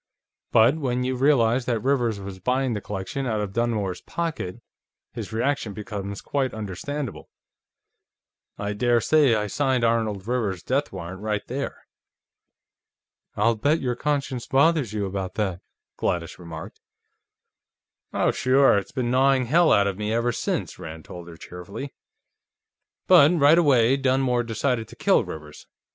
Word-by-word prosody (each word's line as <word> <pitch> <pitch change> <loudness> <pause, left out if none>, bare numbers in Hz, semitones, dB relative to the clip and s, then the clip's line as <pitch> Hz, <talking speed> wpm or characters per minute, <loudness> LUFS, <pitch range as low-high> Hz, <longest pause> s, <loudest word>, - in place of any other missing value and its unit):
But 115 +7 +5
when 125 -3 -1
you 130 +1 -1
realize 125 -2 +3
that 115 -3 -1
Rivers 120 -6 +1
was 95 -1 -8
buying 125 +4 0
the 105 - -3
collection 105 +8 -4
out 110 -3 0
of 100 -2 -4
Dunmore's 105 -6 -1
pocket, 165 - -4 0.5
his - - -6
reaction 115 -1 -1
becomes 100 -1 -6
quite 135 -4 -2
understandable. 110 +6 -5 1.3
I 105 0 -3
daresay 120 +4 +3
I 105 -1 0
signed 130 +3 0
Arnold 110 -4 0
Rivers's 110 -8 -1
death 140 +3 -1
warrant, 95 0 -7
right 105 -1 -2
there." 140 +3 -5 1.5
"I'll 110 +3 +3
bet 145 +9 +1
your 125 -2 -1
conscience 140 -3 -2
bothers 140 -3 +3
you 105 -2 -2
about 95 -1 -4
that," 95 -5 -2 0.4
Gladys 85 0 -2
remarked. 85 +3 -9 1.3
"Oh, - - +2
sure; 130 -4 +4
it's 100 - -10
been 120 -2 -2
gnawing 130 0 +3
hell 165 +7 +4
out 100 - +5
of 100 0 -2
me, 105 0 -2
ever 115 +2 +1
since," - - -3
Rand 80 0 -8
told 85 -1 -9
her 85 -1 -11
cheerfully. 95 +12 -8 1.1
"But, 145 +4 +7
right 150 +3 +6
away, 135 -5 +4
Dunmore 130 -2 +1
decided 115 0 -1
to - - -13
kill - - +3
Rivers. 75 -1 -10
115 Hz, 145 wpm, -24 LUFS, 100-135 Hz, 1.5 s, But